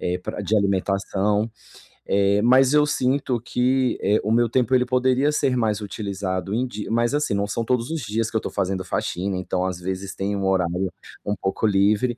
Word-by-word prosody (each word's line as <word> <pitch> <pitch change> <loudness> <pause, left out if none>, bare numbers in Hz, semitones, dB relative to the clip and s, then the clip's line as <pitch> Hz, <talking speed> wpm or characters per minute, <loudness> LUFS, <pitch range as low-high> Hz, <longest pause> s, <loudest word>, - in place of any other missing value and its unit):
eh, 90 0 -1
pra 90 - -6
de 105 +2 0
alimentação. 100 +2 0 0.6
Eh, 100 +1 +3
mas 130 +3 +5
eu 150 0 +5
sinto 130 -2 0
que, 125 +1 +1
eh, 105 +2 +3
o 105 - -1
meu 120 +1 +3
tempo, 125 +2 +1
ele 125 0 +4
poderia 130 +2 +2
ser 140 -4 +1
mais 110 -3 0
utilizado 100 -1 -4
em 125 +2 +1
di 105 -4 -6
mas, 120 +3 +1
assim, 145 -8 0
são 115 +3 -2
todos 125 +3 0
os 165 - -2
dias 110 0 -2
que 110 - 0
eu - - -1
tô - - -4
fazendo 95 -1 -2
faxina, 95 +1 -2
então, 90 0 -2
às 95 -2 -2
vezes, 95 +1 -5
tem 100 +1 -2
um 100 -1 -2
horário 95 -1 0 0.4
um 105 - -1
pouco 95 +3 -1
livre 105 +5 +2
105 Hz, 195 wpm, -23 LUFS, 95-125 Hz, 0.6 s, mas